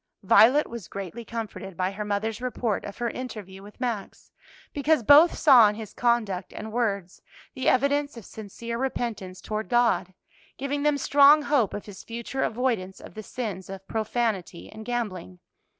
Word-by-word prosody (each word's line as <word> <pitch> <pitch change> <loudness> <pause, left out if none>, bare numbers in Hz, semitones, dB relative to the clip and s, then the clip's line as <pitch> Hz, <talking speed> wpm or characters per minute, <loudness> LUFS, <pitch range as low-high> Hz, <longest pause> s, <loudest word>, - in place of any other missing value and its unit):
Violet 230 +10 +6
was 235 -5 -8
greatly 200 +4 -7
comforted 215 -5 -7
by 185 +1 0
her 210 +2 -5
mother's 210 +2 -2
report 245 -4 -2
of 200 - -8
her 240 -1 -2
interview 210 -7 -8
with 205 +4 -14
Max, 235 -6 -4 0.4
because 290 -2 +2
both 295 +8 +7
saw 255 -8 +7
in 210 - -4
his 215 -2 -8
conduct 220 -7 0
and 220 +1 -7
words 200 -6 -2 0.3
the 260 - +1
evidence 285 +1 +1
of 225 - -10
sincere 230 +2 -7
repentance 230 -8 -3
toward 215 -3 -4
God, 235 -6 +2 0.4
giving 280 +1 -2
them 295 0 +2
strong 285 +2 +6
hope 280 -9 +1
of 205 - -6
his 205 -2 -11
future 235 +3 -5
avoidance 225 -6 -1
of - - -12
the 215 - -7
sins 205 -4 -6
of 195 0 -9
profanity 220 -5 -2
and 220 0 -10
gambling. 205 -7 -4
225 Hz, 165 wpm, -26 LUFS, 200-250 Hz, 0.4 s, both